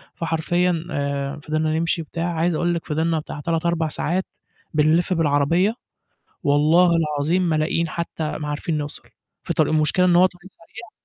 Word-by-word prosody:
فحرفيًا 170 +1 0
آآ، 140 -1 -2
فضلنا 155 +1 0
نمشي 165 0 0
وبتاع 170 +2 -3
عايز 165 0 +1
أقول 175 +2 +1
لِك 170 - -5
فضلنا 160 +1 0
بتاع 150 - -8
3 165 +2 -2
4 170 -2 +1
ساعات 175 +4 -2 0.5
بنلِف 160 +5 +3
بالعربية، 165 +6 +2 0.7
والله 155 +5 +4
العظيم 155 +3 0
ما 155 - +1
لاقيين 160 +2 0
حتى 160 -2 -4
ما 150 -1 -5
عارفين 150 +2 -2
نوصل 145 0 -7 0.4
في - - -2
طريق. - - +2
المشكلة 155 +4 +2
إن 175 -1 +4
هو 185 +1 +7
طريق 185 +1 -11
سريع. 220 +7 -13
165 Hz, 165 wpm, -22 LUFS, 150-175 Hz, 0.7 s, هو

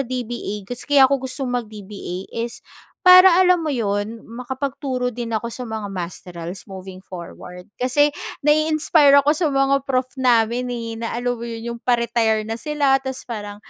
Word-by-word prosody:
DBA, 240 -5 -4
gus 245 +7 -8
kaya 285 -2 +6
ko 275 0 +2
gustong 260 0 -4
mag-DBA 210 -5 -6
is 230 +1 -5 0.4
para 365 0 +8
alam 360 -2 +4
mo 305 - -1
yun, 215 -1 -2
makapagturo 255 +1 -3
din 240 -1 -5
ako 225 +1 -2
sa 250 +2 -6
mga 220 -3 -5
masterals 180 0 -7
moving 190 -1 -9
forward, 180 0 -10 0.2
kasi 290 +4 +3 0.3
nai-inspire 305 -1 +4
ako 295 - +4
sa 315 0 0
mga 275 0 +2
prof 255 -1 +1 0.2
namin, 240 0 +2
eh, 230 -2 -5
na 230 0 -3
alam 245 +1 -1
mo 235 - -5
yun, 230 0 -6
yung 235 - -8
pa-retire 235 -3 +1
na 225 +2 -5
sila 285 -3 +2
tapos 265 0 -6
parang, 205 -3 -6
240 Hz, 160 wpm, -21 LUFS, 220-275 Hz, 0.4 s, para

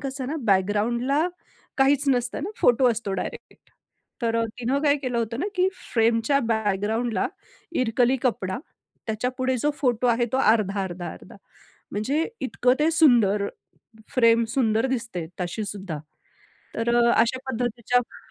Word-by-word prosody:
कसं 270 -2 -4
ना 305 - -3
बॅकग्राऊंडला 235 - +2 0.5
काहीच 275 +1 +4
नसतं 245 +1 0
ना, 380 - -3
फोटो 245 +1 +5
असतो 215 -3 -3
डायरेक्ट. 190 - -7 0.5
तर 230 -1 +1
अ, - - +1
तिने 250 +3 0
काय 285 0 +4
केलं 255 -4 -2
होतं 230 +3 -2
ना, - - -1
की 370 0 +3 0.2
फ्रेमच्या 230 +4 +3
बॅकग्राऊंडला 220 +2 0 0.6
इरकली 245 +2 +2
कपडा. 220 -5 -1 0.5
त्याच्यापुढे 250 +4 -1
जो 295 - +4
फोटो 250 -2 +1
आहे 240 0 +2
तो - - +2
अर्धा-अर्धा-अर्धा 195 -6 -1 0.6
म्हणजे 270 +10 0 0.2
इतकं 250 -1 +1
ते 310 +2 +3
सुंदर. 235 -11 +4 0.7
फ्रेम 230 -2 +5
सुंदर 225 -2 +2
दिसते 230 -10 -3
तशीसुद्धा. 190 -3 -4 0.8
तर 235 +1 0
अ, 235 0 +4
अशा 235 +3 +2
पद्धतीच्या. 245 0 -2
235 Hz, 130 wpm, -24 LUFS, 215-260 Hz, 0.8 s, फोटो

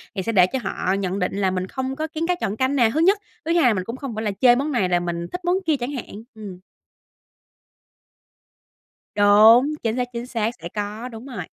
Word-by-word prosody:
thì 190 - -1
sẽ 230 - -2
để 185 -5 +5
cho 265 +6 -3
họ 190 -1 -2
nhận 195 0 -2
định 180 - -1
là 195 -2 +1
mình 185 0 -3
không 260 +4 -4
có 310 +3 -3
kén 320 +1 -4
cá 360 - +1
chọn 215 - -3
canh 260 +3 0
nè 240 -5 +4
thứ 305 - 0
nhất, 380 +5 +4 0.3
thứ 330 - -1
hai 340 -1 +3
là 245 - +5
mình 185 -3 -2
cũng 230 +6 -6
không 265 -4 -6
phải 220 - -3
là 210 - -1
chê 245 -2 +7
món 280 +4 -1
này 200 -9 0
là 175 -1 +2
mình 170 -1 -4
thích 360 0 -6
món 355 +1 +2
kia 315 - +2
chẳng 245 +3 -3
hạn, 230 -5 -7
ừm. 200 -4 -9 2.6
Đúng, 215 +7 +6
chính 225 -1 0
xác, 250 -1 -1
chính 235 0 -5
xác, 225 -3 -1
sẽ 170 - -5
có, 210 +3 -4
đúng 225 0 -10
rồi. 240 -9 -6
230 Hz, 240 wpm, -22 LUFS, 200-265 Hz, 2.6 s, chê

